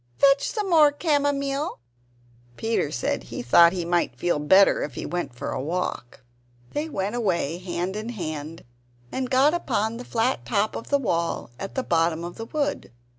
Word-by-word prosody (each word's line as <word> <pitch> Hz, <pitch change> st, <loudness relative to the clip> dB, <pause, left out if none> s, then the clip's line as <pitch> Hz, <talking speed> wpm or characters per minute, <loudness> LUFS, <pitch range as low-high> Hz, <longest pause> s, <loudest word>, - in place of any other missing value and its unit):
fetch 280 Hz, 0 st, +4 dB
some 425 Hz, -4 st, -2 dB
more 315 Hz, -5 st, +6 dB
camomile!" 285 Hz, -2 st, 0 dB, 0.8 s
Peter 225 Hz, -9 st, 0 dB
said 125 Hz, -, -2 dB
he -, -, -6 dB
thought 170 Hz, +8 st, +7 dB
he 175 Hz, -2 st, -3 dB
might 170 Hz, -8 st, 0 dB
feel 175 Hz, +3 st, 0 dB
better 190 Hz, +7 st, +5 dB
if 135 Hz, -, -4 dB
he -, -, -5 dB
went 175 Hz, -6 st, -3 dB
for 135 Hz, -, -4 dB
a -, -, -3 dB
walk. 150 Hz, -6 st, -4 dB, 0.5 s
They 300 Hz, +2 st, -3 dB
went 200 Hz, -4 st, -2 dB
away 175 Hz, -8 st, 0 dB
hand 180 Hz, +1 st, -3 dB
in 215 Hz, +2 st, -4 dB
hand, 160 Hz, -6 st, -5 dB, 0.5 s
and 260 Hz, -1 st, -2 dB
got 270 Hz, +4 st, +4 dB
upon 230 Hz, -9 st, -1 dB
the 245 Hz, -, -7 dB
flat 245 Hz, +2 st, 0 dB
top 215 Hz, -1 st, 0 dB
of -, -, -7 dB
the 285 Hz, -, +4 dB
wall 170 Hz, -, -2 dB
at 195 Hz, -, -6 dB
the 260 Hz, -, 0 dB
bottom 165 Hz, -2 st, +1 dB
of 175 Hz, 0 st, -7 dB
the 225 Hz, -, -5 dB
wood. 290 Hz, +3 st, -2 dB
205 Hz, 175 wpm, -25 LUFS, 170-275 Hz, 0.8 s, thought